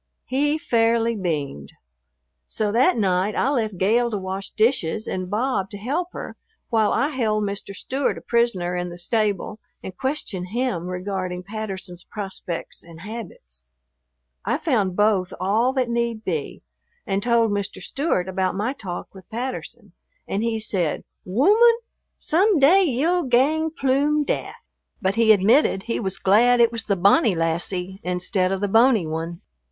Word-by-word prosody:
He 290 +3 +1
fairly 230 -5 +2
beamed. 150 - -3 0.7
So 210 -1 -1
that 255 - +3
night 195 0 +1
I 265 - +1
left 220 -8 -1
Gale 230 +6 +2
to 215 - -2
wash 190 +1 -5
dishes 220 -3 0
and 185 -1 -4
Bob 210 -2 -1
to 205 - -8
help 285 - -2
her - - -7 0.3
while 220 -2 +3
I 285 - +1
held 220 -7 0
Mr. 200 0 -4
Stewart 270 +7 -2
a - - -8
prisoner 200 -7 0
in 180 0 -2
the 175 - -9
stable 210 +2 -1 0.2
and 185 - -7
questioned 220 -7 -3
him 215 -5 -2
regarding 180 -1 -4
Patterson's 195 -3 -6
prospects 190 -5 -6
and 165 -1 -13
habits. 185 - -9 0.8
I - - 0
found 210 - 0
both 205 -3 +2
all 220 +7 +2
that 260 -2 0
need 235 -2 -1
be, 160 -6 -3 0.4
and 195 0 -1
told 230 -1 +2
Mr. 200 -1 -3
Stewart 275 - -1
about 190 0 -1
my 215 +7 -1
talk 185 -10 -7
with 190 -2 -14
Patterson, 250 +3 -6 0.4
and 200 - -1
he 230 -1 0
said, 190 -7 -1 0.2
"Wooman, 420 - +5 0.4
some 380 +4 +2
day 310 +8 +6
ye'll 330 +4 +1
gang 290 +5 +2
ploom 295 0 +1
daft." - - -2 0.4
But 190 -4 0
he 225 0 +4
admitted 210 +1 +4
he 230 - -2
was 190 -3 -2
glad 240 +5 +4
it 235 -1 +5
was 230 -1 -5
the 200 - +1
"bonny 200 - +4
lassie, 180 +3 -2
instead 180 +1 0
of 195 0 -2
the 205 - +1
bony 225 -2 +4
one." 165 +2 -4
215 Hz, 155 wpm, -23 LUFS, 185-245 Hz, 0.8 s, day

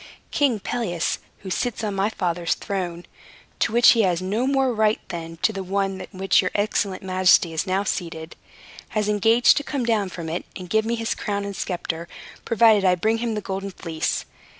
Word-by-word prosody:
King 270 -7 +2
Pelias, 195 -6 -2 0.2
who 190 - -6
sits 240 +3 -2
on 210 -2 -1
my 195 +2 +1
father's 175 -5 -1
throne 180 -3 -4 0.5
(to - - +1
which 235 +1 +6
he 230 - +6
has 180 -4 +2
no 205 +7 -1
more 270 -2 +2
right 215 -1 +2
than 165 -1 -6
to 220 - +3
the 195 - -4
one 195 0 -2
on - - -7
which 195 0 +4
your 185 - -1
excellent 205 -2 0
majesty 185 -2 +4
is 160 +4 -2
now 190 +2 +1
seated), 165 -4 -4 0.6
has 210 -1 +1
engaged 225 +3 +4
to 290 - 0
come 275 -4 -2
down 215 -5 +1
from 170 -2 -7
it, 165 +2 -3
and 180 -2 -8
to - - -2
give 220 0 +3
me 235 +1 0
his 225 -1 -1
crown 200 -1 -3
and 200 -1 -5
sceptre, 170 -2 -4 0.4
provided 225 -3 +5
I 185 -1 +4
bring 220 +5 0
him 230 -1 -2
the 210 - -2
Golden 195 0 -4
Fleece. 165 -4 -3
195 Hz, 200 wpm, -23 LUFS, 180-225 Hz, 0.6 s, which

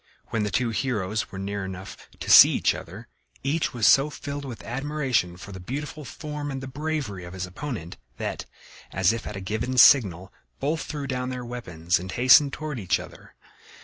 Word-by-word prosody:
When 110 - -1
the 105 - 0
two 125 +1 0
heroes 110 -4 -2
were 95 - -7
near 100 +1 -3
enough 95 0 -8
to - - -2
see - - +11
each - - +2
other, - - -9 0.4
each 150 +4 0
was 120 -4 -1
so 135 +2 +6
filled 145 -1 -6
with 125 -4 -8
admiration 130 -9 -1
for 100 - -10
the 95 - -8
beautiful 145 +9 -6
form 150 0 -6
and 135 -1 -4
the 130 - -7
bravery 140 - -3
of 90 +1 -9
his 95 -1 -4
opponent 90 - -6 0.2
that, - - -4 0.5
as 95 +3 +3
if 115 - -5
at 105 - -5
a - - -4
given 110 +7 -2
signal, 100 -8 +6 0.3
both 155 +4 -1
threw 145 -2 -5
down 125 -1 -2
their 125 -1 -5
weapons 90 -8 -2
and 95 +1 -6
hastened 130 +3 +6
toward 150 -4 -5
each 95 -2 +1
other. - - -12
120 Hz, 190 wpm, -25 LUFS, 95-140 Hz, 0.5 s, see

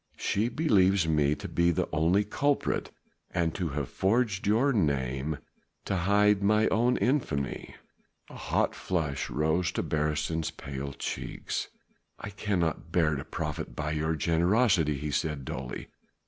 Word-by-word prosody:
She 110 +4 0
believes 100 - +3
me 75 -2 +2
to - - -7
be 85 0 +2
the 85 - 0
only 85 +6 +3
culprit 140 +7 0 0.4
and 85 -3 0
to 90 -3 -2
have 70 -1 -3
forged 100 -1 0
your 120 +7 +3
name 70 - 0 0.5
to - - -1
hide 100 +2 +3
mine 105 +2 +3
own 120 +3 +3
infamy." 115 - -1 0.5
A - - -13
hot - - 0
flush 75 -6 -2
rose 80 +5 +1
to - - -1
Beresteyn's 75 +1 -1
pale 70 0 -6
cheeks. - - -4 0.5
"I 105 - -7
cannot 90 -5 -1
bear 80 -4 +2
to 70 - -4
profit - - -5
by 75 +1 -2
your 80 +1 0
generosity," 85 - +2
he 75 +2 -4
said 75 -3 -1
dully. 65 -1 -6
85 Hz, 140 wpm, -29 LUFS, 75-105 Hz, 0.5 s, believes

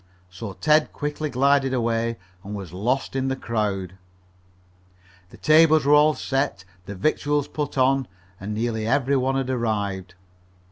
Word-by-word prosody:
So 95 +2 -7
Ted 150 - +2
quickly 150 +1 -3
glided 135 0 +2
away 115 -1 -1 0.3
and 105 +2 -6
was 95 -5 -8
lost 125 +9 -1
in 135 0 0
the 135 - 0
crowd. 100 -7 -3 1.3
The - - -15
tables 155 -1 +5
were 145 - +4
all 150 +1 +5
set, 135 -9 -2 0.2
the 100 - -6
victuals 145 +6 0
put 145 -2 -4
on, 135 0 +2 0.3
and 105 +2 -5
nearly 110 -1 -2
every 140 +2 +2
one 135 0 +1
had 135 -1 -1
arrived. 100 -6 -2
130 Hz, 145 wpm, -23 LUFS, 105-140 Hz, 1.3 s, tables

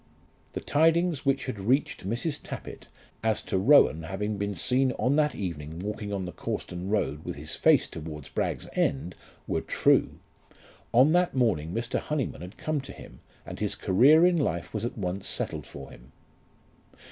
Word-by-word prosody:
The - - -4
tidings 165 0 +2
which 135 0 +2
had 130 -6 -4
reached 130 0 0
Mrs. 120 +7 -2
Tappitt - - -8 0.4
as 110 -1 +1
to 95 - -1
Rowan 100 - +5
having 100 +5 -3
been 100 0 -2
seen 125 +8 +1
on 130 +3 +1
that 150 -2 +2
evening 80 -5 -5
walking 105 +2 -4
on 95 -2 -2
the 90 - -5
Cawston 90 +1 -5
road 100 -8 -1
with - - -5
his 75 +2 -5
face - - +4
towards 75 -3 -8
Bragg's - - -2
End 85 +6 0 0.3
were - - -1
true. - - +2 0.7
On 130 +6 +5
that 180 -1 +2
morning 95 - +1
Mr. 115 +4 -2
Honyman 150 - -3
had 90 +4 -9
come 155 -2 -2
to 135 - -9
him, - - -13 0.3
and - - -8
his - - -1
career 140 - +5
in 180 -1 +4
life 85 - -2
was - - -2
at 120 - -5
once 95 -1 -3
settled - - -2
for 70 -1 -10
him. 65 +3 -16
105 Hz, 170 wpm, -27 LUFS, 90-140 Hz, 0.7 s, Rowan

